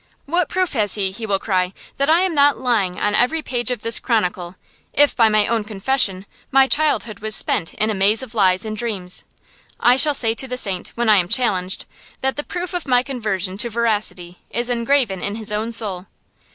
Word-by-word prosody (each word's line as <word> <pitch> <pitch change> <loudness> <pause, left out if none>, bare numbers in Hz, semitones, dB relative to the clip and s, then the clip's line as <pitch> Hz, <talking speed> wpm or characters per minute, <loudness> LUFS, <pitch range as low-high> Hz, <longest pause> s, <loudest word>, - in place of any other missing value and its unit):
What 340 +2 0
proof 370 -2 -1
has 210 -6 +3
he, 195 -2 0
he 220 +3 -6
will 200 -2 +1
cry, 185 -2 -1 0.2
that 280 +2 +1
I 330 +3 +4
am 375 -2 0
not 285 -1 +3
lying 225 -7 -1
on 205 - 0
every 275 +9 +1
page 245 -1 -1
of 245 -4 -3
this 230 0 +1
chronicle, 180 -6 -2 0.4
if, 290 0 +4
by 225 -3 +4
my 215 -1 +2
own 230 -2 -1
confession, 205 -2 0 0.2
my 270 0 +5
childhood 265 -7 -1
was 215 0 -2
spent 165 -5 -1
in 215 +1 0
a - - -1
maze 205 +5 +2
of 245 -3 -10
lies 190 -2 +2
and 215 0 -4
dreams? 205 -6 -4 0.6
I 245 +1 +4
shall 295 +1 +6
say 225 -4 +4
to 265 +3 0
the 250 0 -5
saint, 190 -7 0
when 240 0 -1
I 215 -1 +5
am 175 -2 0
challenged, 190 -7 0 0.4
that 265 0 -1
the 295 - -4
proof 355 +3 -6
of 355 -4 -4
my 250 -1 +3
conversion 210 -8 -3
to 235 - 0
veracity 205 -6 -2
is 240 +1 -2
engraven 235 -4 0
in 200 - -3
his 220 -1 -3
own 215 +2 -2
soul. 200 -5 +1
225 Hz, 210 wpm, -19 LUFS, 195-260 Hz, 0.6 s, shall